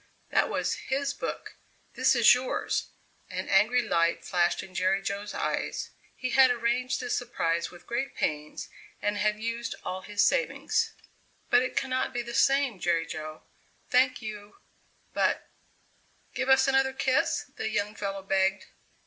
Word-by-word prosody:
"That - - +3
was - - -1
his 275 +1 0
book; - - -6 0.4
this - - +3
is - - +8
yours." 250 +1 -1 0.4
An - - -4
angry 250 0 +4
light 170 -5 +1
flashed 175 -2 +1
in 185 - -12
Jerry 185 +2 +2
Jo's 200 +1 -4
eyes. - - -2 0.2
He 255 -1 -3
had 265 0 +7
arranged 245 +1 0
this 250 -2 -1
surprise 170 -9 -1
with 175 -1 -15
great 240 +3 -3
pains 150 0 -3 0.3
and 205 0 -1
had 210 0 +1
used 230 +1 -3
all 185 +1 -3
his 205 +2 +1
savings. - - +1 0.6
"But 245 - +6
it 255 - -3
cannot 260 -1 0
be 240 - -1
the 235 0 -7
same, 270 -5 +3
Jerry 170 -1 +1
Jo. 155 -1 -7 0.5
Thank 255 -1 +3
you 210 -1 -8 0.6
but - - +1 0.4
" - - -37
"Give 260 0 -2
us 265 0 +6
another 270 0 +3
kiss?" 265 -1 0
The - - -2
young 210 -1 -1
fellow 195 -2 -4
begged. 190 0 +1
220 Hz, 155 wpm, -28 LUFS, 190-255 Hz, 0.6 s, is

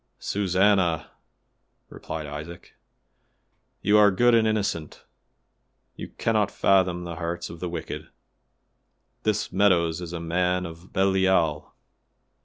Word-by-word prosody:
"Susannah!" 95 -3 +1 0.8
replied 80 -1 -7
Isaac, 75 +4 -9 1.1
"you 105 +2 +5
are 105 -1 +7
good 120 +5 +3
and 115 -1 +4
innocent; 105 -7 -2 0.9
you - - -7
cannot 110 -3 0
fathom 90 -3 +2
the 85 -1 -6
hearts 85 0 -4
of 85 - -10
the 90 - -4
wicked. 85 -1 -6 1.1
This 105 -1 -1
Meadows 90 -4 +2
is 85 -1 -6
a 85 - -4
man 90 +2 0
of 85 +2 -11
Belial. 95 -5 +1
90 Hz, 110 wpm, -25 LUFS, 85-100 Hz, 1.1 s, are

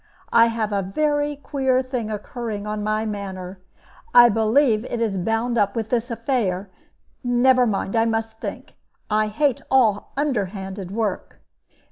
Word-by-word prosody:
I 230 0 +7
have 225 -2 -2
a 200 - +1
very 290 +8 0
queer 265 -2 0
thing 250 -4 -3
occurring 215 0 -5
on 210 0 -3
my 215 +1 0
manor 190 -3 -6 0.5
I 240 0 +9
believe 225 +1 +3
it 240 - -4
is 220 -4 0
bound 225 +5 0
up 200 -1 +1
with 225 -2 -3
this 245 0 0
affair 225 -6 -1 0.5
never 250 0 +4
mind; 200 0 -2
I 225 0 +3
must 225 0 -2
think - - -7 0.3
I 215 0 +2
hate 255 +5 0
all 225 -6 +2
underhanded 195 -8 -2
work." 210 -1 -3
225 Hz, 145 wpm, -22 LUFS, 205-245 Hz, 0.5 s, I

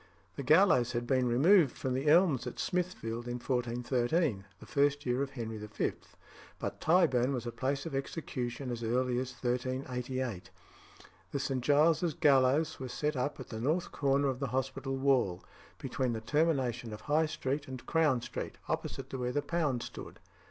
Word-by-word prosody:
The - - -4
gallows 140 -5 +4
had 120 0 -1
been 130 0 +2
removed 150 +6 +4
from 130 - -2
the 135 +3 -2
Elms 155 -7 +4
at 125 - -6
Smithfield 145 -11 -2
in 120 - -3
1413, 125 - 0
the - - -12
first 145 0 +1
year 125 +1 +1
of 140 - -1
Henry 115 -5 -5
V.; 105 0 -2 0.7
but - - -5
Tyburn 140 -7 +3
was 120 -1 -4
a 120 - -3
place 135 +3 -2
of 165 - -5
execution 135 -3 -4
as 120 -1 -4
early 125 +2 +1
as 130 0 -3
1388. 125 -4 -3 0.8
The 140 - -1
St. 135 -1 -1
Giles's 155 +4 +3
gallows 140 +3 +3
was 130 -2 -5
set 150 0 -1
up 135 +3 -2
at 130 - -8
the 110 -1 -5
north 160 +8 0
corner 140 0 +1
of 130 -1 -3
the 140 - -1
hospital 135 +1 -2
wall, 130 -10 +2 0.3
between 125 -2 -2
the 110 - -4
termination 130 -4 0
of 105 - -8
High 155 +2 +2
Street 140 -1 -3
and 130 -2 -8
Crown 150 -6 +2
Street, - - -5
opposite - - -3
to 130 - -4
where 125 0 -1
the 145 +3 -1
Pound 145 -6 0
stood. - - -9
130 Hz, 175 wpm, -32 LUFS, 120-145 Hz, 0.8 s, gallows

